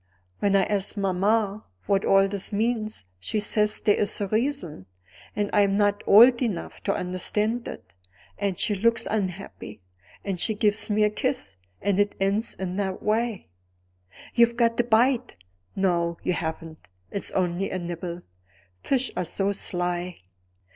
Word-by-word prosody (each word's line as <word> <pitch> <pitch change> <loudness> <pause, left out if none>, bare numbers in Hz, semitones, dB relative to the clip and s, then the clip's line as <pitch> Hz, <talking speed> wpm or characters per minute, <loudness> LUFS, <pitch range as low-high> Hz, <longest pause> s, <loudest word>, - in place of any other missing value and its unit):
When 200 -1 +2
I 195 - +5
ask 205 +1 -1
mamma 200 +2 +1 0.2
what 195 -1 +1
all 195 0 +5
this 195 -1 -3
means, 215 - -1 0.2
she 210 - -2
says 210 0 +2
there 210 - +4
is 210 +2 +2
a 205 - 0
reason, 220 - -2 0.5
and 205 -1 -1
I 210 - +5
am 200 -1 +2
not 205 -1 +2
old 235 +5 +7
enough 215 -9 -3
to - - +1
understand 210 +6 -1
it, - - -9 0.5
and 195 -3 -1
she 210 - 0
looks 230 +4 +2
unhappy, 190 - -4 0.5
and 195 -3 -2
she 220 - 0
gives 210 +1 +1
me 210 0 +2
a 210 - +3
kiss, 100 - -2 0.3
and 200 0 +1
it 205 0 +1
ends 200 +4 0
in 185 0 -4
that 190 -2 -3
way. 220 -1 -1 0.8
You've 235 0 +4
got 230 -1 +2
a - - +5
bite; 245 +2 +2 0.4
no 170 -3 0
you 180 - +1
haven't; 160 -1 -5 0.3
it's 200 - -1
only 185 +1 0
a - - -3
nibble; 175 0 -5 0.6
fish 265 -1 0
are - - -1
so 195 +4 0
sly. 180 -2 -2
200 Hz, 155 wpm, -25 LUFS, 185-220 Hz, 0.8 s, old